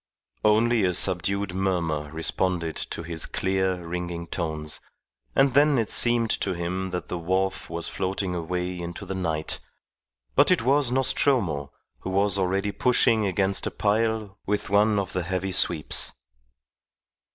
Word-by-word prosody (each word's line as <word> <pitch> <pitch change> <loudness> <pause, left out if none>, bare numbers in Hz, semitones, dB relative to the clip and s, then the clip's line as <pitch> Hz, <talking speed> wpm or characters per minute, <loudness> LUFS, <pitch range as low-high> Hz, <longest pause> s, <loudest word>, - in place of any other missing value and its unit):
Only 110 +1 +4
a 90 -2 +1
subdued 100 +2 +1
murmur 85 -6 -1
responded 85 +1 -1
to 85 - -5
his 80 -2 -1
clear, 95 -2 -1
ringing 85 0 -4
tones; 80 -3 -3 0.6
and 135 -2 +4
then 145 +1 +5
it 115 -3 0
seemed 120 -2 +3
to 95 - -1
him 90 +2 -3
that 90 0 -4
the 90 - -4
wharf 95 +3 -1
was 85 0 -4
floating 95 0 -2
away 90 +1 -3
into 85 0 -6
the - - -4
night; 80 -4 -2 0.7
but 145 - +5
it 180 -9 +3
was 135 0 +3
Nostromo, 120 - +1 0.3
who - - -6
was 100 +1 +2
already 95 +2 0
pushing 115 -2 +3
against 95 +1 0
a - - 0
pile 110 -1 0
with 105 -1 -1
one 105 +1 +4
of 100 -1 -2
the 90 - 0
heavy 95 +2 -2
sweeps. 80 -4 +1
95 Hz, 145 wpm, -25 LUFS, 85-105 Hz, 0.7 s, then